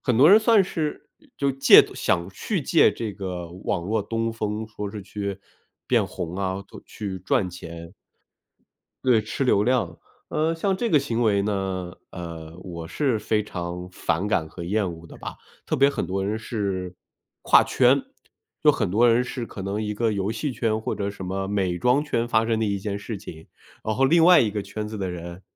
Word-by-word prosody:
很 125 -4 +1
多 145 +8 +7
人 215 +2 +8
算 220 -3 +5
是， 155 -4 -4
呃， - - -23
就 140 -1 +1
借 135 - +8
东 - - -10
想 85 0 0
去 175 - -3
借 165 - +5
这 110 -3 -4
个 90 -3 -5
网 85 - -1
络 105 +1 0
东 115 +2 -2
风， 110 -1 -3
说 105 -2 -6
是 105 -2 -7
去 100 0 -5 0.5
变 - - +2
红 90 -1 -5
啊， 95 -1 -1
或 - - -12
去 100 -3 -5
赚 95 0 0
钱。 85 -1 -9 1.1
对， 125 -4 +5
吃 110 +5 -4
流 105 -5 +3
量， 115 -8 0 0.3
呃， 155 +2 0
像 190 +3 0
这 235 +3 -1
个 155 - +4
行 120 -4 -1
为 100 -3 +3
呢， 95 -3 -2 0.2
呃， 85 -2 -8
我 85 -3 -7
是 130 - 0
非 105 0 0
常 90 -2 -5
反 90 +2 -1
感 80 -6 0
和 85 - -9
厌 95 0 0
恶 80 0 -13
的 - - -12
吧。 - - -7 0.3
特 - - 0
别 140 +1 +5
很 - - -3
多 95 +1 -2
人 105 +3 -1
是 95 -5 -3 0.5
跨 - - +6
圈， 130 +2 +4 0.6
就 - - +7
很 - - -1
多 120 +4 +5
人 125 +2 +3
是 125 -1 -4
可 105 - -9
能 100 +3 -2
一 105 0 -2
个 110 +1 0
游 100 +1 -1
戏 125 +5 -2
圈 110 -2 0
或 - - -2
者 100 0 -2
什 100 -1 -8
么 95 +1 -3
美 95 -3 0
妆 125 - +3
圈 120 -5 -1
发 115 -1 +2
生 115 -1 +1
的 - - +2
一 100 -2 0
件 100 +1 -3
事 105 +1 -5
情， 80 -5 -11 0.4
然 110 - 0
后 135 - +3
另 165 +4 +5
外 180 0 +8
一 105 -4 +1
个 105 -2 -2
圈 105 +1 -5
子 110 +1 -6
的 95 -3 -3
人 85 +1 -8
105 Hz, 225 characters per minute, -24 LUFS, 95-120 Hz, 1.1 s, 人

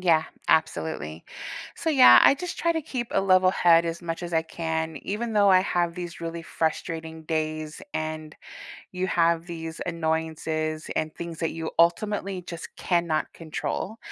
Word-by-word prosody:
Yeah, 165 -3 +3 0.2
absolutely. 155 - 0 0.5
So, - - -3
yeah, 255 - +8
I - - +7
just 355 +4 -6
try 335 0 +2
to 320 - -2
keep 255 -6 -4
a - - +3
level 185 -1 +5
head 170 -2 +5
as 165 0 -4
much 170 +1 -4
as 170 - -6
I 160 -1 +2
can, 160 -1 -3
even 225 +3 -3
though 205 -1 +5
I 185 -1 +7
have 175 -3 0
these 175 -1 -7
really 165 0 -5
frustrating 160 0 -3
days 155 -1 -3
and 155 -1 -4 0.6
you 180 0 -1
have 170 -1 +2
these 165 -1 -6
annoyances 160 -1 -2
and 155 0 -1
things 170 -1 -7
that 165 - -1
you 165 -1 -5
ultimately 195 +2 +1
just 170 -2 -7
cannot 170 -3 0
control. 170 +6 -4
165 Hz, 160 wpm, -26 LUFS, 160-185 Hz, 0.6 s, yeah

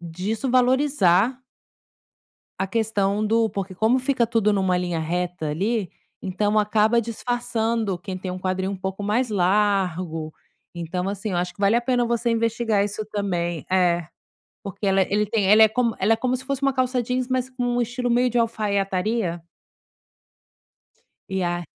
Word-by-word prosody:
disso 185 +9 -3
valorizar 250 -4 +3 1.2
A 190 - 0
questão 210 -1 0
do 225 0 +2
porque 195 -1 -5
como 220 +7 +2
fica 255 -2 +1
tudo 225 -2 +2
em 205 - +1
uma 185 -2 +1
linha 175 -2 -2
reta 175 0 -2
ali, 200 +5 -1 0.3
então 205 +3 0
acaba 215 +2 +3
disfarçando 230 -3 -2
quem 185 +1 -6
tem 185 0 -5
um 180 - -5
quadril 185 +1 -2
um 200 - -4
pouco 190 +2 -5
mais 225 +5 0
largo, 185 -5 0 0.5
então, 180 +2 -3
assim, 205 +2 -4
eu - - -1
acho 180 0 -2
que - - -15
vale 200 +2 +3
a - - +3
pena 245 0 +1
você 235 0 0
investigar 230 -2 +1
isso 205 +1 -4
também, 175 -5 -2
é, 175 -3 +2 0.6
porque 200 +1 -6
ela 195 0 +3
ele 205 +3 0
tem 210 -1 0
ela 215 +2 +8
é - - +7
como 235 0 0
ela 210 +4 +3
é - - +3
como 255 +1 0
se 260 - -11
fosse 275 0 -3
uma 275 -1 +2
calça 255 -1 +1
jeans, 250 +1 -2
mas 255 0 -1
com 255 -1 -4
um 245 - +2
estilo 245 +1 -2
meio 245 +1 +3
de 240 - -1
alfaiataria. 200 -4 0 1.9
E 190 -1 -1
a 175 0 -2
210 Hz, 170 wpm, -23 LUFS, 185-235 Hz, 1.9 s, ela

